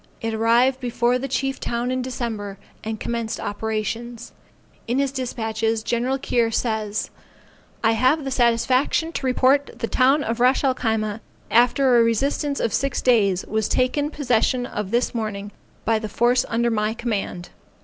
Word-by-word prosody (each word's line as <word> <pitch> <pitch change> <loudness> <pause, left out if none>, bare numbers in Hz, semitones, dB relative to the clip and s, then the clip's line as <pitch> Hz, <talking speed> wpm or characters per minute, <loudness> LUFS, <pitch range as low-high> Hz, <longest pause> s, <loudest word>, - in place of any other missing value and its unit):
It 225 0 -3
arrived 235 +4 +3
before 245 0 0
the 270 - -3
chief 270 +1 -2
town 240 +1 -2
in 255 0 -1
December, 225 -6 -4 0.3
and 220 -1 -4
commenced 230 -1 -3
operations. 220 +3 -4 0.6
In 240 +3 0
his 275 -1 +1
despatches 225 -4 -2
Gen. 245 +3 0
Keir 240 -3 +1
says 220 -2 -2 0.7
I 225 - +4
have 255 +7 +2
the 270 - -4
satisfaction 255 +6 +2
to 280 - -4
report 265 +2 +3
the 230 - -2
town 270 +5 +3
of 230 -1 -3
Ras 255 +4 +3
el 265 -2 +3
Khyma, 220 -3 -1 0.3
after 245 +1 +4
a - - +6
resistance 275 +5 0
of 230 - -1
six 275 -1 0
days, 200 -7 +3
was 220 -1 -1
taken 285 +4 +1
possession 250 -3 +1
of 210 -5 -4
this 240 +3 0
morning 210 -3 -4 0.3
by 225 -1 +2
the 215 -1 -5
force 240 +4 +2
under 235 +1 +1
my 215 0 0
command. 205 -7 -3
235 Hz, 160 wpm, -22 LUFS, 220-255 Hz, 0.7 s, a